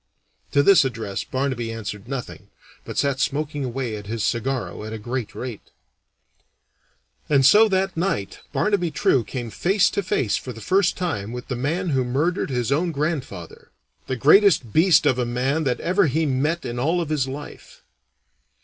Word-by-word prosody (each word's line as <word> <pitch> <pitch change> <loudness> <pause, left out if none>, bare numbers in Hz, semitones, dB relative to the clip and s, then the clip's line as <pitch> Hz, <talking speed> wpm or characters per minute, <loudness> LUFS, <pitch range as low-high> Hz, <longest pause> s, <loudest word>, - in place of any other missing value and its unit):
To 140 - +4
this 195 -2 +6
address 115 -6 -3
Barnaby 130 -4 -2
answered 110 -1 -6
nothing, 135 -2 -6 0.4
but - - -7
sat 140 -2 +1
smoking 145 +2 -1
away 125 -2 -3
at 105 -1 -8
his 110 0 -3
cigarro 120 0 -2
at 110 +1 -6
a - - -4
great 120 +1 -5
rate. 120 -4 -7 1.6
And 140 -3 +4
so 210 +10 +7
that 190 -1 0
night 160 - -2
Barnaby 200 -5 +1
True 135 -4 +2
came 120 -1 -6
face 195 - +2
to - - -1
face 130 - 0
for 125 - -7
the 115 - -11
first 185 - +1
time 115 - -3
with 125 0 -7
the 125 - -2
man 160 +9 -1
who 135 -4 +1
murdered 145 +10 -1
his 125 -1 -1
own 170 +5 +1
grandfather 140 - -4 0.4
the 130 - -1
greatest 150 - +4
beast 165 0 +5
of 130 -3 +2
a - - +2
man 130 +6 -1
that 125 -2 0
ever 185 +1 +2
he 155 +4 0
met 150 +5 0
in 120 0 -4
all 165 +7 +1
of 165 -3 -3
his 145 -4 0
life. 145 +2 -9
135 Hz, 175 wpm, -23 LUFS, 120-165 Hz, 1.6 s, so